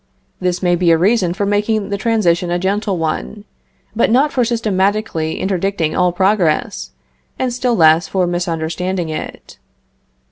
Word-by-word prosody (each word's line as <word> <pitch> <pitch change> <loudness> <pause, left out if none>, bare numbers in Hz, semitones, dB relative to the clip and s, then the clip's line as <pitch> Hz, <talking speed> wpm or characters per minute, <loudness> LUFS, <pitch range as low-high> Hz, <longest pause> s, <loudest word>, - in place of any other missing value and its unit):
This 180 0 -2
may 175 -1 +3
be 175 0 +1
a 165 - +5
reason 185 0 +2
for 195 +3 -2
making 205 +1 0
the 200 - -1
transition 195 -6 +1
a 175 - 0
gentle 195 +1 -1
one, 165 +6 -4 0.5
but 230 - +2
not 270 +6 +2
for 250 - +2
systematically 205 -7 -1
interdicting 190 -4 -1
all 180 -1 +2
progress, 175 - 0 0.5
and 255 -2 -1
still 250 -1 0
less 160 0 +4
for 185 -2 0
misunderstanding 175 0 -2
it. 155 - -7
185 Hz, 145 wpm, -17 LUFS, 170-215 Hz, 0.5 s, a